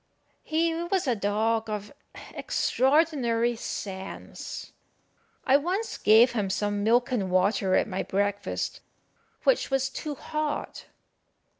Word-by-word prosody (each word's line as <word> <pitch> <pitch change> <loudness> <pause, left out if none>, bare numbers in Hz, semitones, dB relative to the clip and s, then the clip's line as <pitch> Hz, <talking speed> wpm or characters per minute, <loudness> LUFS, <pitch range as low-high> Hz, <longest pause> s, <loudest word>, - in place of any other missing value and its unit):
He 330 +1 0
was 345 +2 -1
a 250 -3 +1
dog 220 +2 0
of 210 -1 -5 0.4
extraordinary 260 -5 +1
sense. 195 -4 -6 0.7
I 265 +1 +6
once 370 +9 -2
gave 225 +4 +6
him 210 -5 -1
some 205 +1 -1
milk 240 +4 +3
and 205 -7 0
water 185 +1 +2
at - - +2
my 190 -3 -2
breakfast, 200 +1 -2 0.6
which - - +2
was 270 -1 +1
too 295 +2 -5
hot. 305 +2 -4
230 Hz, 115 wpm, -27 LUFS, 205-295 Hz, 0.7 s, I